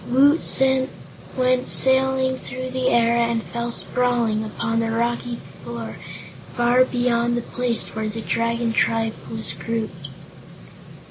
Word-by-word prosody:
Woot 285 +5 +4 1.0
went 255 0 +1
sailing 265 0 +3
through 255 0 -6
the 255 0 -1
air 235 0 +3
and 235 -1 +1
fell 235 0 -4
sprawling 235 -3 +1
upon 225 +1 -2
the 230 0 0
rocky 235 +1 -1 0.3
floor 115 -3 -6 0.6
far 240 +1 +4
beyond 240 -1 +1
the 240 - -2
place 245 -2 -2
where 220 0 -2
the 225 +1 -5
Dragon 230 0 -1
Tribe 225 -1 +1 0.2
was 220 -8 -2
grouped. 170 -2 -4
235 Hz, 125 wpm, -22 LUFS, 225-250 Hz, 1.0 s, Woot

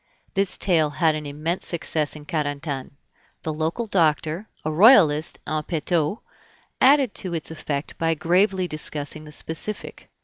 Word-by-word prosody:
This 195 -1 +1
tale 165 -5 +3
had 160 +1 +1
an 150 -1 -5
immense 155 +5 -2
success 160 -3 0
in 150 -1 -11
Carentan. 145 -4 -3 0.5
The 155 - -2
local 160 +9 -2
doctor, 165 0 0 0.2
a 155 - 0
Royalist 160 - +5
in 155 0 -1
petto, 160 +3 -1 0.6
added 270 -3 +5
to 180 -3 -3
its 160 0 -4
effect 150 -2 -4
by 165 0 +1
gravely 185 +3 +2
discussing 155 -1 -4
the 150 - -11
specific. 160 +7 -5
160 Hz, 140 wpm, -23 LUFS, 150-180 Hz, 0.6 s, Royalist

